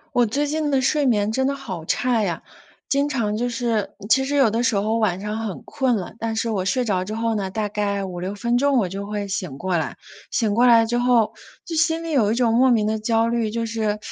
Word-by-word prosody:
我 245 -1 +4
最 285 +7 0
近 305 0 -1
的 275 -2 +2
睡 280 +2 +1
眠 210 -3 +2
真 265 +4 +1
的 280 - -1
好 190 -12 -7
差 245 +5 +1
呀， 175 -5 -2 0.4
经 280 +1 +1
常 215 -6 -1
就 245 +2 -1
是 230 -4 -2 0.2
其 265 - +5
实 285 +2 -2
有 270 -6 +4
的 230 +2 0
时 235 -3 +1
候 215 +3 +1
晚 195 -5 +1
上 210 +2 -4
很 215 -5 -5
困 260 -4 0
了， 190 -4 -5
但 225 0 -2
是 225 +1 -1
我 190 -4 -1
睡 250 +5 0
着 190 -4 0
之 210 +3 -5
后 230 0 0
呢， 200 -3 -2
大 210 +1 -2
概 200 -1 -2
5-6 185 +1 -5
分 235 +3 -1
钟 280 0 +3
我 210 -6 +2
就 195 +2 -6
会 205 -1 -3
醒 185 -8 -4
过 185 +4 -1
来。 160 - -2 0.3
醒 220 -4 0
过 240 +4 +4
来 230 -1 +6
之 240 +2 0
后， 245 -3 +3 0.3
就 330 - -5
心 325 +1 +1
里 330 - -4
有 225 -8 +3
一 - - +1
种 235 -2 +2
莫 255 +3 +5
名 225 -4 +3
的 215 +1 0
焦 225 +1 +1
虑， 230 -2 0
就 230 +1 -2
是 220 -2 -1
225 Hz, 265 characters per minute, -22 LUFS, 205-250 Hz, 0.4 s, 来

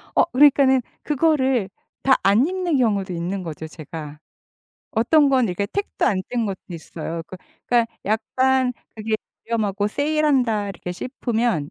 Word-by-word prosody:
어, - - +6
그러니까는 265 -1 +5 0.2
그거를 265 - +1 0.3
다 265 - +5
안 205 +7 +4
입는 360 -4 0
경우도 205 -6 +1
있는 180 +3 -3
거죠 160 -2 -6
제가. 155 -1 -8 0.7
어떤 280 +6 +4
건 260 -2 +3
이렇게 200 +1 -2
텍도 405 - -2
안 190 -7 +1
뗀 235 -3 0
것도 195 -2 -4
있어요. 165 0 -6
그 185 - -9 0.3
그니까 240 -1 +3 0.2
약간 255 +4 +1 0.2
그게 220 0 -2 0.3
유명하고 210 -3 0
세일한다 275 -6 +1
이렇게 180 -2 -6
싶으면 230 - -1
230 Hz, 305 characters per minute, -22 LUFS, 190-265 Hz, 0.7 s, 어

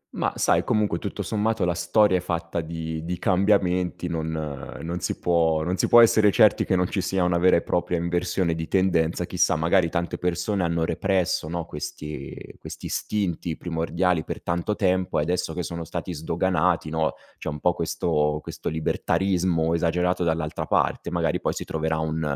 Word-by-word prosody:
Ma - - 0
sai - - +2
comunque 105 -7 +1
tutto - - -4
sommato 110 -2 0
la 85 - +1
storia 90 +3 +3
è - - -1
fatta 85 -1 -3
di 80 0 -5
di 90 +2 -3
cambiamenti, 90 -2 +1
non 80 -2 -3 0.5
non 85 +2 -4
si 85 - -3
può 80 -2 +2
non 90 +3 -1
si - - +1
può 120 - +8
essere 110 -2 +5
certi 105 +2 +4
che 95 - +1
non 90 0 +2
ci 95 - -2
sia 95 0 0
una 90 -1 +2
vera 90 +1 +5
e 85 - +1
propria 90 0 0
inversione 85 +1 0
di 80 0 -4
tendenza, 90 -3 +1
chissà 90 0 +1
magari 85 +2 +2
tante 85 0 -2
persone 90 +3 -1
hanno 85 -1 0
represso 95 -4 0
no, 85 0 -3
questi 75 -1 -7 0.2
questi - - -9
istinti 90 -5 -2
primordiali 85 0 0
per - - -6
tanto 85 +5 -1
tempo 95 -2 +1
e 75 - +2
adesso 85 0 -2
che 90 - -2
sono 85 0 -5
stati 85 +2 -5
sdoganati, 85 0 0
no, 80 0 0 0.2
c'è - - -4
un 75 0 -5
po' 90 +3 +2
questo 75 -3 0
questo - - -5
libertarismo 85 +1 0
esagerato 90 +2 +1
dall'altra 80 -2 -2
parte, - - +1
magari 85 -3 0
poi - - 0
si - - -5
troverà 80 0 -1
un 80 0 -2
85 Hz, 180 wpm, -25 LUFS, 80-90 Hz, 0.5 s, può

